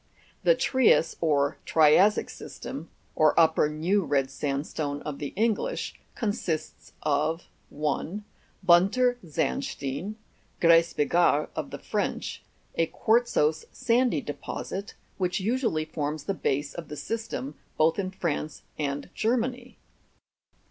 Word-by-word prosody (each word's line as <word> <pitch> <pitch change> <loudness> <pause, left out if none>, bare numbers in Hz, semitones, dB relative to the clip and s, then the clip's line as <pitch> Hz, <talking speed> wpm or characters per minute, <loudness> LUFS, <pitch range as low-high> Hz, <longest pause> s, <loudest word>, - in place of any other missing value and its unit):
27. - - -38
The - - +4
TRIAS 250 -10 +3
or 145 -3 +2
TRIA'SSIC 165 +7 +5
SYSTEM - - -8 0.2
(or 155 +1 +4
upper 160 -2 +4
new 175 +7 +1
red 135 -3 0
sand 140 +1 -2
stone 145 -2 -3
of 150 -2 -5
the 145 - -3
English) 230 - 0 0.2
consists 205 -8 -3
of: 155 +3 0 0.2
1. 155 +7 -2 0.4
Bunter 200 +8 +4
Sandstein, 140 - -2 0.4
(gres 170 0 +5
bigarre 150 0 +3
of - - -3
the - - -6
French), - - -3 0.3
a 165 - +1
quartzose 220 -11 +2
sandy 240 - +2
deposit, 190 +7 -5 0.2
which 180 +1 0
usually 215 - 0
forms 150 -1 -3
the 195 - -1
base 145 -5 -1
of 170 -2 -7
the 150 - -7
system, 220 - -4 0.2
both 160 +4 +3
in 185 -2 -1
France 155 -5 -3 0.2
and 145 -1 -2
Germany. 245 +2 -1
165 Hz, 120 wpm, -27 LUFS, 150-210 Hz, 0.4 s, TRIA'SSIC